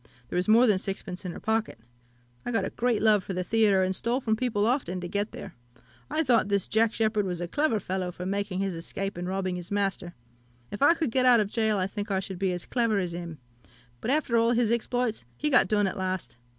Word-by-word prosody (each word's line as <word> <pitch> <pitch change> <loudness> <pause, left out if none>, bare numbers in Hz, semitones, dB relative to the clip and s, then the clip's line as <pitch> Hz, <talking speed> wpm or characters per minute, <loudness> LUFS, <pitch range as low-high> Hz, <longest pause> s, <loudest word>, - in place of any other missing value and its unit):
There - - -5
was 180 +2 +1
more 230 +3 +6
than 210 -5 +3
sixpence 190 -1 -5
in 180 - -3
her - - -8
pocket. 220 - -1 0.7
I - - -4
got 230 - 0
a - - -4
great 235 -3 0
love 210 -3 +4
for 190 - -5
the 180 0 -2
theatre, 205 -1 +3
and 185 0 0
stole 235 +6 0
from 220 -4 0
people 220 -3 0
often 225 -7 0
to 180 - -5
get 205 +4 -2
there. 190 - -9 0.6
I 320 - 0
thought 240 -7 +3
this 200 -2 0
Jack 225 +1 +2
Sheppard 215 -2 +1
was 180 -2 -3
a 175 - -3
clever 285 - +1
fellow 185 -1 -3
for 180 +1 -7
making 200 0 -2
his 195 -1 -1
escape 195 +4 -5
and 175 +1 -5
robbing 185 -1 -2
his 175 0 -8
master. 195 -3 -2 0.6
If 205 - -6
I 310 +4 +6
could 315 -7 -1
get 255 +1 +4
out 245 -2 +7
of 210 -1 -1
gaol, 220 -2 +2
I 185 - +1
think 205 +2 -5
I 195 -1 +1
should 190 -1 -6
be 190 -1 +1
as 180 -1 -4
clever 230 -4 +1
as 180 -3 -1
him: 170 -2 -6 0.6
but, - - -3
after 275 -4 +1
all 230 +1 +3
his 235 -2 +2
exploits, 235 - -1
he 300 - -1
got 250 -7 +6
done 205 +1 +2
at 190 - -2
last. 185 -7 -3
205 Hz, 240 wpm, -27 LUFS, 185-230 Hz, 0.7 s, out